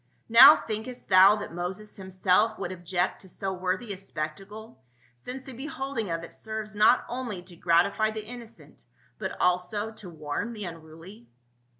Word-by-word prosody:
Now, 235 Hz, +6 st, +10 dB
thinkest 225 Hz, +3 st, -6 dB
thou 190 Hz, +2 st, +8 dB
that 210 Hz, -, -7 dB
Moses 185 Hz, +5 st, -5 dB
himself 190 Hz, +3 st, +1 dB
would 175 Hz, -, -4 dB
object 180 Hz, 0 st, -2 dB
to 190 Hz, -, -14 dB
so 190 Hz, +2 st, -4 dB
worthy 185 Hz, +4 st, -2 dB
a 185 Hz, -, -10 dB
spectacle, 195 Hz, 0 st, -7 dB, 0.3 s
since 250 Hz, -, -9 dB
the 265 Hz, -, -9 dB
beholding 270 Hz, -, -4 dB
of 165 Hz, 0 st, -3 dB
it 170 Hz, -, -10 dB
serves 220 Hz, -1 st, -6 dB
not 210 Hz, -, +4 dB
only 235 Hz, -7 st, -5 dB
to 180 Hz, -1 st, -12 dB
gratify 180 Hz, +6 st, +2 dB
the 215 Hz, -1 st, -6 dB
innocent 235 Hz, 0 st, -13 dB, 0.3 s
but -, -, -5 dB
also 180 Hz, +4 st, 0 dB
to 210 Hz, -4 st, -10 dB
warn 155 Hz, +8 st, -4 dB
the 210 Hz, -3 st, -6 dB
unruly?" 165 Hz, +6 st, -11 dB
200 Hz, 160 wpm, -27 LUFS, 180-220 Hz, 0.3 s, Now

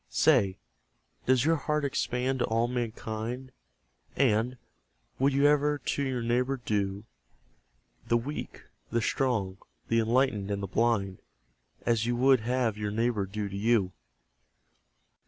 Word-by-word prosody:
Say, 110 Hz, -12 st, +3 dB, 0.7 s
does 130 Hz, +1 st, +4 dB
your 165 Hz, +1 st, +3 dB
heart 150 Hz, 0 st, -1 dB
expand 130 Hz, -1 st, -1 dB
to -, -, +2 dB
all 115 Hz, +1 st, +1 dB
mankind? 120 Hz, +1 st, -4 dB, 0.6 s
And, 125 Hz, -1 st, +2 dB, 0.6 s
would 135 Hz, +2 st, +3 dB
you 140 Hz, +1 st, +2 dB
ever 150 Hz, 0 st, +3 dB
to 140 Hz, -, -2 dB
your 130 Hz, -3 st, -1 dB
neighbour 125 Hz, +3 st, +1 dB
do 100 Hz, -4 st, -2 dB, 1.0 s
The 120 Hz, -, +3 dB
weak, 140 Hz, +6 st, -6 dB, 0.3 s
the 115 Hz, -, +1 dB
strong, 110 Hz, -5 st, 0 dB, 0.3 s
the 115 Hz, -, +3 dB
enlightened, 115 Hz, -3 st, +1 dB
and 100 Hz, 0 st, -2 dB
the -, -, 0 dB
blind 100 Hz, -2 st, 0 dB, 0.7 s
As 115 Hz, -1 st, +1 dB
you 120 Hz, -, +1 dB
would 130 Hz, +1 st, +5 dB
have 115 Hz, -2 st, -1 dB
your 105 Hz, -1 st, -2 dB
neighbour 110 Hz, -2 st, 0 dB
do 105 Hz, +1 st, -3 dB
to 100 Hz, -, -7 dB
you? 105 Hz, -2 st, +2 dB
120 Hz, 135 wpm, -29 LUFS, 105-130 Hz, 1.0 s, would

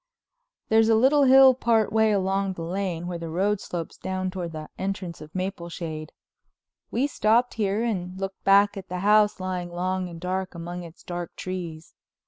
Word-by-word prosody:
There's 220 Hz, 0 st, +4 dB
a 225 Hz, -, +5 dB
little 275 Hz, +5 st, +5 dB
hill 265 Hz, 0 st, +8 dB
part 225 Hz, -4 st, +1 dB
way 220 Hz, -1 st, +4 dB
along 195 Hz, -1 st, 0 dB
the 170 Hz, -, -6 dB
Lane 175 Hz, -1 st, -3 dB
where 175 Hz, -1 st, -4 dB
the 165 Hz, -1 st, -5 dB
road 195 Hz, +5 st, +1 dB
slopes 170 Hz, -2 st, -6 dB
down 185 Hz, 0 st, -3 dB
toward 180 Hz, -3 st, -5 dB
the 155 Hz, -1 st, -7 dB
entrance 190 Hz, -3 st, -4 dB
of 155 Hz, 0 st, -11 dB
Mapleshade. 170 Hz, -4 st, -5 dB, 0.8 s
We 250 Hz, +4 st, +1 dB
stopped 240 Hz, -3 st, +2 dB
here 210 Hz, 0 st, 0 dB
and 185 Hz, -5 st, -3 dB
looked 195 Hz, 0 st, -5 dB
back 200 Hz, +1 st, +5 dB
at 195 Hz, -2 st, -8 dB
the 180 Hz, 0 st, -4 dB
house 210 Hz, 0 st, +4 dB
lying 185 Hz, -1 st, -3 dB
long 185 Hz, +1 st, -2 dB
and 170 Hz, -1 st, -9 dB
dark 185 Hz, +1 st, -3 dB
among 175 Hz, +1 st, -6 dB
its 170 Hz, 0 st, -12 dB
dark 175 Hz, -1 st, -6 dB
trees. 170 Hz, -4 st, -6 dB
185 Hz, 175 wpm, -25 LUFS, 175-210 Hz, 0.8 s, hill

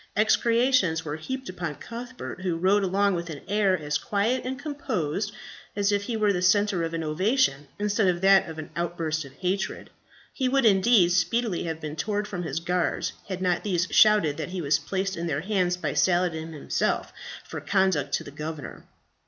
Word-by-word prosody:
Execrations 220 Hz, -5 st, +3 dB
were 150 Hz, 0 st, -3 dB
heaped 260 Hz, +11 st, -5 dB
upon 175 Hz, -4 st, -4 dB
Cuthbert, 245 Hz, -, -8 dB
who 180 Hz, -3 st, -1 dB
rode 195 Hz, +4 st, +3 dB
along 200 Hz, +1 st, +2 dB
with 170 Hz, -1 st, -3 dB
an 150 Hz, -3 st, -7 dB
air 200 Hz, -2 st, +2 dB
as 150 Hz, -2 st, -2 dB
quiet 215 Hz, +5 st, 0 dB
and 260 Hz, +1 st, -3 dB
composed 220 Hz, -, -3 dB, 0.4 s
as 200 Hz, 0 st, +1 dB
if 205 Hz, 0 st, 0 dB
he 230 Hz, 0 st, -2 dB
were 210 Hz, -2 st, +2 dB
the 180 Hz, -, -1 dB
centre 195 Hz, 0 st, +3 dB
of 165 Hz, 0 st, -3 dB
an 165 Hz, -, -2 dB
ovation 160 Hz, -, +1 dB
instead 205 Hz, 0 st, +1 dB
of 175 Hz, -1 st, +1 dB
that 195 Hz, -2 st, +5 dB
of 160 Hz, -, -8 dB
an 155 Hz, -, -7 dB
outburst 165 Hz, -3 st, -2 dB
of 135 Hz, -, -13 dB
hatred. 185 Hz, +5 st, -3 dB, 0.4 s
He 260 Hz, -2 st, 0 dB
would, 270 Hz, -1 st, +2 dB
indeed, 195 Hz, -2 st, +5 dB
speedily 180 Hz, +3 st, +1 dB
have 160 Hz, -1 st, -3 dB
been 150 Hz, -1 st, -6 dB
torn 205 Hz, +6 st, -1 dB
from 200 Hz, -4 st, -5 dB
his 160 Hz, -2 st, -3 dB
guards, 180 Hz, +1 st, -1 dB
had 185 Hz, -1 st, -4 dB
not 180 Hz, -1 st, +1 dB
these 185 Hz, -3 st, 0 dB
shouted 210 Hz, -9 st, +5 dB
that -, -, -4 dB
he 185 Hz, 0 st, -4 dB
was 150 Hz, -2 st, +2 dB
placed 190 Hz, 0 st, -2 dB
in 170 Hz, 0 st, -3 dB
their 145 Hz, -2 st, -1 dB
hands 180 Hz, -2 st, 0 dB
by -, -, -2 dB
Saladin 175 Hz, -3 st, +1 dB
himself 150 Hz, -3 st, -1 dB, 0.3 s
for -, -, -7 dB
conduct 190 Hz, -8 st, +1 dB
to -, -, -3 dB
the -, -, -10 dB
governor. 150 Hz, +1 st, -7 dB
185 Hz, 190 wpm, -26 LUFS, 165-210 Hz, 0.4 s, that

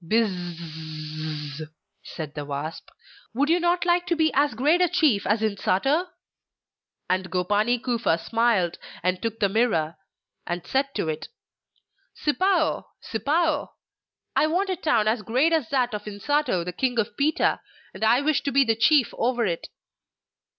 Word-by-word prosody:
'Biz 220 Hz, +4 st, +2 dB
z 155 Hz, -3 st, -6 dB
z,' 155 Hz, -, -6 dB, 0.3 s
said 155 Hz, -3 st, -7 dB
the 150 Hz, -, -5 dB
wasp, 145 Hz, +3 st, -6 dB, 0.5 s
'would 285 Hz, +4 st, +1 dB
you 345 Hz, -, +4 dB
not 345 Hz, +1 st, +1 dB
like 350 Hz, 0 st, +2 dB
to 345 Hz, -, +1 dB
be 320 Hz, -1 st, +2 dB
as 285 Hz, -3 st, +2 dB
great 300 Hz, +9 st, +3 dB
a 360 Hz, -, +4 dB
chief 310 Hz, -, +2 dB
as 210 Hz, +2 st, +2 dB
Insato?' 220 Hz, -, +1 dB, 1.0 s
And 185 Hz, 0 st, 0 dB
Gopani 205 Hz, +7 st, +1 dB
Kufa 235 Hz, -8 st, 0 dB
smiled, 220 Hz, -3 st, +1 dB, 0.2 s
and 185 Hz, 0 st, 0 dB
took 225 Hz, -1 st, -3 dB
the 200 Hz, -, +3 dB
Mirror 190 Hz, -7 st, +1 dB, 0.5 s
and 175 Hz, 0 st, -3 dB
said 275 Hz, +1 st, -1 dB
to -, -, -1 dB
it: 155 Hz, 0 st, -3 dB, 0.9 s
'Sipao, 350 Hz, +2 st, +1 dB
Sipao, 295 Hz, +6 st, 0 dB, 0.6 s
I 310 Hz, -, +4 dB
want 375 Hz, +5 st, 0 dB
a -, -, 0 dB
town 240 Hz, -, +1 dB
as 220 Hz, +1 st, +1 dB
great 260 Hz, +10 st, +2 dB
as 310 Hz, -8 st, +1 dB
that 250 Hz, -4 st, +1 dB
of 210 Hz, -, -5 dB
Insato, 210 Hz, -, 0 dB
the 180 Hz, -, -4 dB
King 245 Hz, +5 st, -1 dB
of 220 Hz, -3 st, -1 dB
Pita; 295 Hz, +2 st, +1 dB, 0.3 s
and -, -, -7 dB
I 235 Hz, +4 st, +4 dB
wish 300 Hz, 0 st, +1 dB
to 280 Hz, -, -2 dB
be 275 Hz, +1 st, +4 dB
chief 275 Hz, +2 st, +4 dB
over 240 Hz, -1 st, +1 dB
it! 170 Hz, -4 st, -3 dB
230 Hz, 155 wpm, -25 LUFS, 180-295 Hz, 1.0 s, you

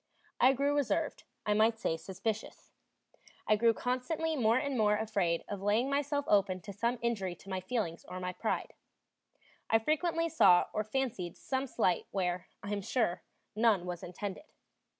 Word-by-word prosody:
I 255 Hz, +2 st, +6 dB
grew 280 Hz, +2 st, +1 dB
reserved, 285 Hz, -4 st, -1 dB, 0.2 s
I 210 Hz, -, +2 dB
might 220 Hz, +2 st, +3 dB
say 165 Hz, -, -1 dB
suspicious. 200 Hz, +6 st, -5 dB, 0.7 s
I 215 Hz, -, +4 dB
grew 230 Hz, +2 st, +4 dB
constantly 260 Hz, +8 st, -1 dB
more 230 Hz, -3 st, +3 dB
and 280 Hz, 0 st, -1 dB
more 210 Hz, -3 st, +3 dB
afraid 200 Hz, -6 st, 0 dB
of 205 Hz, -2 st, -5 dB
laying 220 Hz, +7 st, +2 dB
myself 285 Hz, 0 st, 0 dB
open 190 Hz, -2 st, +3 dB
to 200 Hz, +1 st, -8 dB
some 235 Hz, +5 st, 0 dB
injury 200 Hz, -7 st, -1 dB
to 195 Hz, -, -15 dB
my 190 Hz, -1 st, -2 dB
feelings 185 Hz, -5 st, -2 dB
or 185 Hz, -, -6 dB
my 180 Hz, 0 st, -3 dB
pride. -, -, -2 dB, 1.0 s
I 225 Hz, -, +6 dB
frequently 325 Hz, +7 st, +1 dB
saw 180 Hz, -, +5 dB
or 215 Hz, -, 0 dB
fancied 215 Hz, -7 st, -3 dB
some 265 Hz, 0 st, -2 dB
slight 185 Hz, -7 st, +1 dB
where, 180 Hz, -2 st, -1 dB, 0.2 s
I 200 Hz, -, -5 dB
am 205 Hz, -1 st, -1 dB
sure, 210 Hz, -3 st, 0 dB, 0.3 s
none 215 Hz, -5 st, +3 dB
was 175 Hz, -1 st, -5 dB
intended. 190 Hz, -, -6 dB
215 Hz, 165 wpm, -32 LUFS, 190-255 Hz, 1.0 s, I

